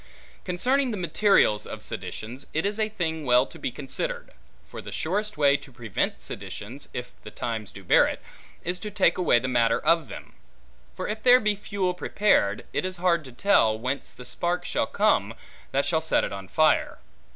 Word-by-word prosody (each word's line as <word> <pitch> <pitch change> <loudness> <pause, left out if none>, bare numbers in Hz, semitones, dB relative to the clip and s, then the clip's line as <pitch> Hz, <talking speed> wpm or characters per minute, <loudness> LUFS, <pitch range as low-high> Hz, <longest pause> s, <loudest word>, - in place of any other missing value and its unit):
Concerning 250 +9 +1
the 215 - -3
materials 175 - +3
of - - -7
seditions. 120 +6 -6
It 160 - +1
is 205 +2 -1
a 215 0 +1
thing 160 -6 -3
well 125 -1 +4
to 165 - -14
be - - -2
considered; 485 - -4 0.4
for - - -8
the - - -9
surest 205 +3 -2
way 140 -2 +5
to 140 - -15
prevent 120 -5 -3
seditions 120 +8 -7
(if 125 - -6
the - - -9
times 110 -3 -4
do 100 - -12
bear - - +5
it) - - -4 0.4
is 180 +1 -2
to 210 - -5
take 190 -4 +2
away 175 -9 +4
the 125 +2 -1
matter 115 -2 +2
of 165 -1 +2
them. - - -10 0.6
For - - -4
if 215 +1 -4
there 250 +1 +7
be 210 -3 +1
fuel 195 -2 -2
prepared, 180 - +1
it - - 0
is 185 0 -3
hard 175 -2 +2
to 130 - -10
tell, 120 - +3
whence 130 +5 -3
the 125 - -12
spark 175 +8 -2
shall - - 0
come, - - +1 0.4
that 140 +1 +1
shall 160 -2 +1
set 160 - +2
it - - -3
on 95 -1 -7
fire. 155 +6 +2
160 Hz, 195 wpm, -26 LUFS, 125-200 Hz, 0.6 s, there